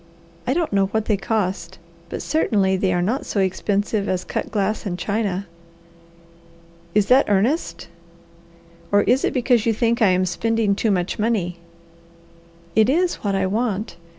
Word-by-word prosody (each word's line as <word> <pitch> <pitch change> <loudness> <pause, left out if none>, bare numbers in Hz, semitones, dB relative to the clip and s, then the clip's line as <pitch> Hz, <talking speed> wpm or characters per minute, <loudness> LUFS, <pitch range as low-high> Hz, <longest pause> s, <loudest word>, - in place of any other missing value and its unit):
I 260 - +1
don't 335 -9 -1
know 195 -1 +3
what 220 +2 -2
they 215 - +2
cost, 195 -1 -2 0.3
but - - -5
certainly 200 -11 +1
they 190 0 0
are 175 -1 +1
not 235 +9 -1
so 205 - -2
expensive 200 +2 0
as 185 -1 -1
cut - - -4
glass 210 0 -1
and 185 -5 -3
china." 200 -1 -2 1.5
"Is 210 -2 +4
that 255 +4 +4
earnest 225 - 0 1.0
or 205 0 +4
is 255 +3 +2
it - - +1
because 245 -3 +2
you 225 - +3
think 235 +1 +1
I 210 - +5
am 185 0 +2
spending 220 +3 0
too 215 +3 0
much 185 -1 -1
money?" 200 -6 -1 1.2
"It 220 +2 +4
is 345 +5 +1
what 200 -2 -2
I 195 0 +1
want. 210 +1 -2
205 Hz, 160 wpm, -21 LUFS, 190-230 Hz, 1.5 s, I